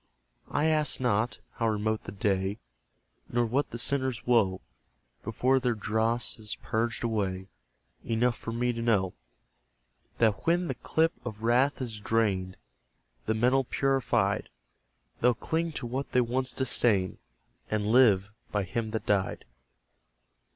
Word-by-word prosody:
I 150 - +1
ask 155 -2 +2
not, 120 -2 +1 0.2
how 115 - +1
remote 110 0 -1
the - - -6
day, 95 0 0 0.7
Nor 120 0 +1
what 130 +6 0
the 120 - -6
sinners' 130 -1 -1
woe, 105 -6 +3 0.6
Before 125 +5 +2
their 125 -2 0
dross 110 +2 0
is 105 -1 -6
purged 115 +2 -1
away; 95 -5 -1 0.5
Enough 120 +1 +1
for 115 - -6
me 120 +1 0
to 115 - -4
know 100 -6 +2 1.0
That 110 +2 +1
when 175 +1 +3
the - - -1
cup 160 +1 +1
of 110 -2 -7
wrath 130 +4 +2
is 110 -4 -6
drained, 100 -4 0 0.7
The 110 - +1
metal 125 +4 +3
purified, 125 -7 +1 0.7
They'll 125 0 +4
cling 165 +6 -1
to 140 - -4
what 130 +4 -4
they 125 - +5
once 130 +2 -1
disdained, 110 -8 +1 0.5
And 105 -1 0
live 105 -6 +5 0.2
by 105 -1 0
Him 110 +5 -3
that 110 0 -3
died. 100 -2 0
115 Hz, 135 wpm, -29 LUFS, 105-125 Hz, 1.0 s, they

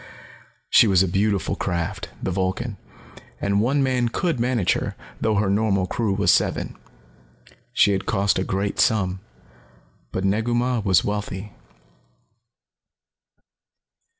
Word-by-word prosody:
She 115 - +7
was 95 -2 +4
a - - 0
beautiful 100 0 0
craft, 90 +2 -3
the - - -1
Vulcan, 95 +4 -2 0.6
and 100 0 +1
one 135 +5 +2
man 125 -2 +1
could 165 +1 -1
manage 120 -5 +1
her, - - -3 0.3
though 110 -1 +1
her 100 0 +1
normal 100 -1 +1
crew 105 0 -1
was 100 +1 +3
seven. - - 0 1.0
She 105 - +4
had 95 0 -2
cost 100 -2 +1
a - - 0
great 100 +1 -2
sum. 95 -4 +2 0.9
But 95 - -2
Negu 110 +5 +1
Mah 125 0 +1
was 95 -5 +3
wealthy. 105 -1 -4
100 Hz, 125 wpm, -23 LUFS, 95-115 Hz, 1.0 s, She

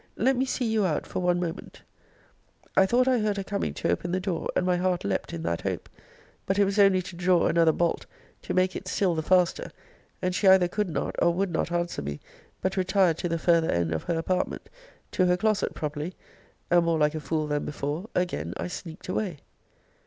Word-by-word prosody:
Let 265 +4 +3
me 260 +2 +1
see 255 -1 -2
you 220 -2 +1
out 170 -5 0
for - - -4
one 180 -1 +2
moment. 170 -2 -6 0.9
I 190 - +5
thought 250 +4 +3
I 255 -2 +3
heard 210 -1 0
her 195 - -2
coming 200 +1 -2
to - - 0
open 175 - -2
the 185 - 0
door, 185 -3 -3
and 180 - +1
my 180 -1 +2
heart 180 0 0
leapt 100 -1 -2
in 85 -1 -5
that 85 0 -1
hope; - - -3 0.6
but 195 - +1
it 200 - +5
was 200 +1 -1
only 195 -2 +5
to 175 - -9
draw 180 0 +3
another 165 -1 +4
bolt, 170 +1 -1 0.3
to - - -4
make 185 0 +2
it 190 - -6
still 185 -1 +1
the 160 - -1
faster; 180 +1 +2 0.5
and 180 0 -1
she 195 - +1
either 190 -1 +7
could 205 +2 -2
not 155 - -3
or 170 - +5
would 195 0 0
not 165 +1 -1
answer 175 0 -1
me, 70 0 -5 0.4
but 190 +1 -1
retired 185 -3 +2
to 175 - -2
the 165 - 0
farther 165 -1 +3
end 85 -1 0
of 80 - -3
her 170 - 0
apartment, 180 +3 -2 0.4
to 185 - +2
her 180 0 +3
closet, 215 +1 0
probably; 150 +3 -4 0.6
and, 175 -1 +5
more 165 -1 +2
like 150 -1 +2
a 155 - -3
fool 155 +1 -1
than 150 -1 -1
before, 150 +8 -4
again 180 0 -1
I - - -4
sneaked 165 -2 -8
away. 185 -3 -2
180 Hz, 220 wpm, -27 LUFS, 165-190 Hz, 0.9 s, either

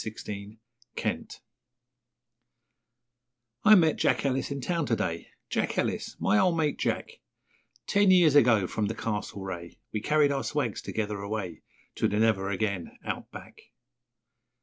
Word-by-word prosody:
Since 110 0 -7 0.7
Then - - -2 2.3
I 215 0 +8
met 160 -5 +4
Jack - - +1
Ellis 135 -1 0
in 140 -1 -3
town 165 +2 -1
to 115 - +2
day 85 -5 -3 0.2
Jack - - -1
Ellis - - -1
my 105 - +3
old 175 -2 +3
mate, 150 -2 0
Jack - - -2 0.7
Ten 200 -1 +3
years 175 -5 +6
ago, 115 -9 +5
from 105 +3 -2
the 110 - -3
Castlereagh, 95 -5 -4 0.2
We 105 - -3
carried 150 +2 +3
our 135 -1 -1
swags 135 -8 -2
together 105 -2 -3
away 100 -5 -4 0.4
To - - +2
the 105 - -1
Never 105 -3 +2
Again, 100 -3 -2
Out - - -4
Back. - - -11
115 Hz, 140 wpm, -28 LUFS, 100-150 Hz, 2.3 s, I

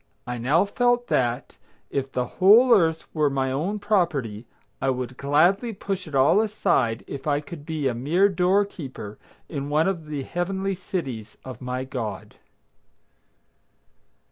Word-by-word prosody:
I 120 0 -4
now 145 - +3
felt 245 +3 +1
that, 120 +1 0 0.3
if 135 -1 -2
the 125 - -1
whole 215 - +6
Earth 165 -6 +2
were 150 -2 +2
my 135 -1 -1
own 170 +10 -1
property, 150 - -1 0.3
I 135 - +1
would 125 -1 -3
gladly 175 - +2
push 195 -2 -4
it 150 - -6
all 135 +10 +5
aside 175 - 0
if 140 +2 -7
I 145 -1 +2
could 150 0 -10
be 155 -4 -1
a 125 - 0
mere 155 +12 +2
door 190 +2 +2
keeper 130 - -9 0.3
in 140 -2 -4
one 155 +3 +2
of 170 -5 -2
the 145 -3 -4
heavenly 190 +5 -2
cities 145 - -5
of 130 -2 -8
my 125 0 -3
God. 115 -7 -5
150 Hz, 150 wpm, -24 LUFS, 130-190 Hz, 0.3 s, whole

